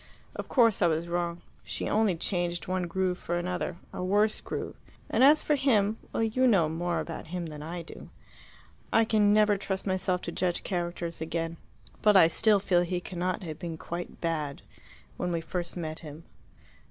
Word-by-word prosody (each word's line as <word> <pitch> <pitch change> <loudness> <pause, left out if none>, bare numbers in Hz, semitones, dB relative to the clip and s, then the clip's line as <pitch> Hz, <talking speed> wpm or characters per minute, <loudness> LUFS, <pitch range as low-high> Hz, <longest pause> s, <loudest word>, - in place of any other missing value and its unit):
Of - - -6
course 230 -5 +4
I 175 - +5
was 165 +1 0
wrong. 170 0 -2 0.2
She - - -3
only 210 -3 +2
changed 175 +1 -1
one 185 -1 -1
groove 185 +1 -1
for 175 - -2
another 180 0 -2 0.2
a - - -4
worse 205 +3 +2
groove. - - -5 0.4
And - - +3
as 295 +3 +7
for 300 - +2
him 225 -7 +2
well, - - 0
you 255 +4 +2
know 190 -9 +4
more 170 +2 -1
about 165 - -6
him 175 +1 -4
than 150 -2 -7
I 170 +3 -5
do. - - -11 0.8
I 225 - +4
can 210 -2 +3
never 210 -1 +4
trust 190 -1 -3
myself 185 -1 0
to 170 - -4
judge 180 0 -1
characters 175 -2 -3
again. 165 +1 -3 0.4
But 210 -2 +6
I 165 -3 +7
still 210 +4 +4
feel 180 -3 +2
he 175 0 -1
cannot 180 +2 -3
have 155 -3 -6
been 170 -3 -5
quite 170 +2 -6
bad 155 -4 -2 0.5
when 180 - -2
we 170 - 0
first 175 +2 -4
met 160 -2 -4
him. 155 0 -10
175 Hz, 185 wpm, -29 LUFS, 170-200 Hz, 0.8 s, as